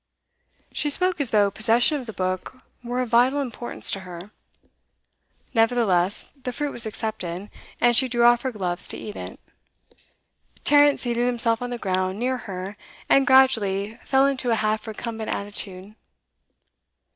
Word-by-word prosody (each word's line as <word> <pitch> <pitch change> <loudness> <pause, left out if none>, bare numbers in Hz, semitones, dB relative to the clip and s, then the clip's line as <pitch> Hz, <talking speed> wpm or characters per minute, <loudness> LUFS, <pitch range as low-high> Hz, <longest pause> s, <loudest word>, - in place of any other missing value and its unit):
She 295 - 0
spoke 360 +2 +2
as 270 - -1
though 205 -2 +3
possession 235 +8 +2
of 245 - -12
the - - -5
book 185 +5 -3 0.3
were 245 +1 -2
of 250 - -3
vital 250 +5 +4
importance 245 -3 -2
to 195 - -1
her. 180 +1 -10 1.2
Nevertheless, 225 -6 +1
the 250 - -3
fruit 290 +3 -3
was 235 -1 -2
accepted, 205 -4 -5 0.3
and 240 0 +4
she 260 +2 +4
drew 240 -1 +1
off 240 0 +5
her 260 - -2
gloves 180 -5 -3
to - - -3
eat 210 - -8
it. - - -8 1.2
Tarrant 290 -1 +5
seated 240 0 -1
himself 230 -2 +1
on 245 - -3
the 245 - -3
ground, 185 -2 -1
near 255 +3 -1
her, 190 +2 -6 0.3
and 275 +1 +4
gradually 225 -5 +3
fell 270 0 +3
into 265 -3 0
a 230 - +3
half 215 +1 -1
recumbent 220 0 -5
attitude. 200 -1 -3
230 Hz, 155 wpm, -24 LUFS, 200-255 Hz, 1.2 s, off